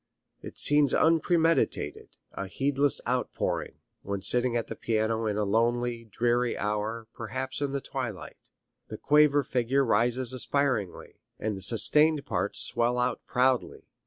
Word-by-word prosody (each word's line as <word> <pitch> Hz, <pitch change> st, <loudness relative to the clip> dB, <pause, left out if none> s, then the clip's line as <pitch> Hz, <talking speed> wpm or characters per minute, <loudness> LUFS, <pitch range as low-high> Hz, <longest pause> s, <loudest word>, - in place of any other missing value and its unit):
It -, -, -10 dB
seems 145 Hz, -2 st, +4 dB
unpremeditated, 165 Hz, +1 st, +1 dB
a 100 Hz, -, -6 dB
heedless 140 Hz, +5 st, 0 dB
outpouring, 125 Hz, +1 st, -2 dB, 0.3 s
when 100 Hz, 0 st, -4 dB
sitting 125 Hz, +1 st, +2 dB
at 115 Hz, -, -2 dB
the -, -, -7 dB
piano 110 Hz, 0 st, -1 dB
in 105 Hz, -1 st, -2 dB
a 105 Hz, -, 0 dB
lonely, 115 Hz, +3 st, 0 dB
dreary 120 Hz, +3 st, 0 dB
hour, 105 Hz, +2 st, -3 dB
perhaps 130 Hz, +4 st, -5 dB
in 140 Hz, -1 st, -1 dB
the 140 Hz, 0 st, -3 dB
twilight. 120 Hz, -, -7 dB, 0.4 s
The -, -, -8 dB
quaver 150 Hz, -1 st, +3 dB
figure 130 Hz, +2 st, 0 dB
rises 120 Hz, +3 st, +1 dB
aspiringly, 130 Hz, -7 st, -2 dB, 0.2 s
and 110 Hz, -1 st, -3 dB
the 95 Hz, -, -8 dB
sustained 145 Hz, +9 st, +4 dB
parts -, -, -1 dB
swell 120 Hz, +1 st, 0 dB
out 125 Hz, 0 st, -1 dB
proudly. 125 Hz, 0 st, 0 dB
120 Hz, 135 wpm, -27 LUFS, 110-140 Hz, 0.4 s, seems